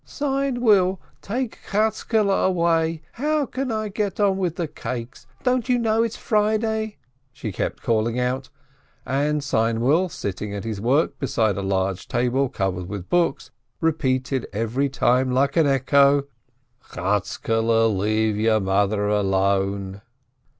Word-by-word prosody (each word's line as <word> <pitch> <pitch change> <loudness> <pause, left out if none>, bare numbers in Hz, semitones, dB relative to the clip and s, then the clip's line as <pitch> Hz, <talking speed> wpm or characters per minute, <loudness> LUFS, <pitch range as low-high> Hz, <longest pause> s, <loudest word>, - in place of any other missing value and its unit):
"Seinwill, 245 - +1 0.2
take 240 +3 -3
Chatzkele 215 0 +1 0.2
away! 165 -3 +1
How 300 +3 0
can 260 0 -3
I 215 -1 -2
get 205 0 -3
on 200 -2 +3
with 175 -3 -1
the 170 - -2
cakes? 125 -3 -7 0.2
Don't 250 0 +1
you 250 - +4
know 225 -1 +2
it's 230 -1 -1
Friday 220 0 0 0.2
?" 130 0 -44
she 125 -4 -6
kept - - -4
calling 115 +1 +1
out, 130 +2 -2 0.6
and 145 +2 0
Seinwill, 125 +8 +1
sitting 100 - -5
at 100 - -5
his 110 -3 -4
work 135 +8 +1
beside 115 -5 +1
a - - -1
POVERTY 95 - -4
109 95 -1 +1
large 95 -2 -5
table 125 +2 +1
covered 90 -3 -3
with 100 -3 -6
books, 175 -1 +1 0.3
repeated 135 -5 0
every 115 +7 -1
time 130 -1 +2
like 135 +2 +1
an 165 -3 +4
echo: 140 +1 +4 0.6
"Chatzkele, 115 +4 0 0.6
let 110 -2 +3
mother 100 +2 +1
alone 100 -1 0
135 Hz, 135 wpm, -23 LUFS, -, 0.6 s, you